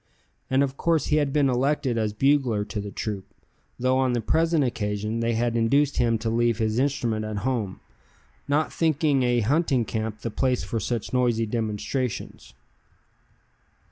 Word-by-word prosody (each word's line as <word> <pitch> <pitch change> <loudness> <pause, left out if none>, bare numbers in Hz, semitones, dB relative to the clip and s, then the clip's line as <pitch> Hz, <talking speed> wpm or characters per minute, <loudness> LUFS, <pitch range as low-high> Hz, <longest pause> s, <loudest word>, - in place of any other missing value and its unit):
And 130 +1 +3
of 135 0 -3
course 165 -4 +1
he - - +5
had 145 -2 +1
been 145 -1 +3
elected 130 0 +1
as 110 -2 0
bugler 125 -2 +2
to 105 - -4
the 100 - -6
troop, 100 -1 -5 0.4
though 130 +1 +2
on 130 -2 +2
the 120 - +1
present 160 +5 +2
occasion 105 -2 -2
they 115 0 0
had 120 +1 0
induced 140 +5 +2
him 115 -1 +2
to 115 +1 -3
leave 120 -1 +2
his 110 0 0
instrument 120 -6 0
at 110 -1 -4
home, 115 -8 -2 0.7
not 145 +2 +1
thinking 155 -3 +2
a 120 -1 +2
hunting 135 0 +1
camp 110 -1 -4
the 115 - -3
place 125 +2 0
for 115 - -3
such 115 +2 -3
noisy 120 -3 +2
demonstrations. 110 - -3
120 Hz, 165 wpm, -25 LUFS, 110-135 Hz, 0.7 s, he